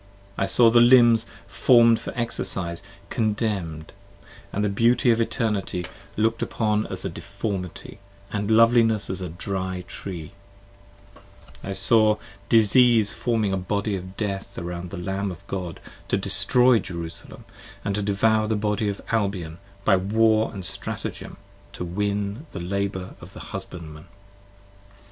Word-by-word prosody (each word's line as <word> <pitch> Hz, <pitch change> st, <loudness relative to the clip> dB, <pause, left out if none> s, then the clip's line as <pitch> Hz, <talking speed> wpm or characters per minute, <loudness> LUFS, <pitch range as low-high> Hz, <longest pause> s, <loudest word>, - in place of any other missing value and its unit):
I 95 Hz, -, 0 dB
saw 115 Hz, +1 st, +6 dB
the 120 Hz, 0 st, +6 dB
limbs 120 Hz, -2 st, +6 dB, 0.2 s
form'd 115 Hz, -2 st, +5 dB
for -, -, -5 dB
exercise, 95 Hz, -7 st, -2 dB, 0.3 s
contemn'd; 105 Hz, -8 st, -2 dB, 0.3 s
& -, -, -21 dB
the 105 Hz, +1 st, 0 dB
beauty 115 Hz, +4 st, +3 dB
of 115 Hz, 0 st, +2 dB
Eternity, 110 Hz, -6 st, -1 dB, 0.3 s
look'd 110 Hz, +2 st, +1 dB
upon 105 Hz, -1 st, 0 dB
as 95 Hz, 0 st, -3 dB
deformity, 100 Hz, 0 st, -5 dB, 0.3 s
& -, -, -18 dB
loveliness 110 Hz, +1 st, +3 dB
as 95 Hz, -, -4 dB
a 90 Hz, -, -4 dB
dry 95 Hz, +1 st, -4 dB
tree: 85 Hz, -3 st, -6 dB, 1.3 s
I 95 Hz, -, -4 dB
saw 105 Hz, +2 st, +4 dB, 0.3 s
disease 115 Hz, -1 st, +5 dB
forming 110 Hz, -5 st, 0 dB
a -, -, +1 dB
Body 100 Hz, +2 st, -1 dB
of 95 Hz, 0 st, -8 dB
Death 100 Hz, -2 st, -4 dB
around 85 Hz, +1 st, -5 dB
the 95 Hz, -, -7 dB
Lamb 95 Hz, +3 st, -3 dB
10 -, -, -2 dB
Of 95 Hz, +3 st, -15 dB
God, 90 Hz, -4 st, -5 dB, 0.3 s
to -, -, +1 dB
destroy 100 Hz, +6 st, +3 dB
Jerusalem, 85 Hz, -3 st, -8 dB, 0.2 s
& -, -, -19 dB
to 100 Hz, +1 st, -1 dB
devour 110 Hz, +2 st, +2 dB
the 110 Hz, -, 0 dB
body 105 Hz, 0 st, 0 dB
of 100 Hz, -, -5 dB
Albion 100 Hz, -7 st, -1 dB, 0.3 s
By 95 Hz, -, +5 dB
war 110 Hz, +3 st, +2 dB
and 95 Hz, -4 st, -7 dB
stratagem 95 Hz, +2 st, -5 dB, 0.4 s
to 90 Hz, -, -5 dB
win 100 Hz, -, -2 dB
the -, -, -5 dB
labour 95 Hz, +1 st, -3 dB
of -, -, -12 dB
the -, -, -10 dB
husbandman. 80 Hz, -1 st, -8 dB
100 Hz, 140 wpm, -24 LUFS, 95-110 Hz, 1.3 s, saw